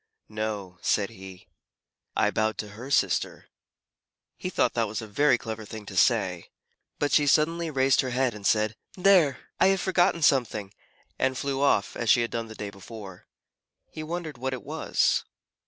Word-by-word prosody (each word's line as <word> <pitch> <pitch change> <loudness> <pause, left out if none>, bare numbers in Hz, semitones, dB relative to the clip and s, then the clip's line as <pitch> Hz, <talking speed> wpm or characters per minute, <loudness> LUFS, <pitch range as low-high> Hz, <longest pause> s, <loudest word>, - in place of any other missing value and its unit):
"No," 105 -4 -4
said 105 +1 +1
he. 95 -3 -12 0.7
"I 105 -1 +2
bowed 110 +1 0
to 105 - -5
her 115 +6 -9
sister." 140 - +1 0.9
He - - -5
thought - - +1
that 115 -2 +1
was 105 0 -4
a 110 - -6
very 125 +5 +3
clever 110 -1 -6
thing 105 0 -9
to 100 - -9
say. 95 -4 +2 0.5
But 145 - 0
she 145 -1 +4
suddenly 165 +3 +2
raised 135 -2 +3
her 130 - -3
head, 125 0 +1
and 105 -1 -10
said, 110 0 +2 0.2
"There! 180 -8 +4 0.2
I - - +6
have 195 0 +3
forgotten 175 -3 +2
something," 110 -8 +2 0.5
and 130 0 +1
flew 135 0 -2
off, 120 -8 +2
as 120 - -2
she 120 - +6
had 115 - -2
done 115 -1 -3
the 110 - -10
day 105 -1 -6
before. 100 -1 -11 0.6
He 155 - -7
wondered 160 -2 -5
what 130 +1 -2
it 130 - -6
was. - - +1
115 Hz, 175 wpm, -27 LUFS, 105-140 Hz, 0.9 s, I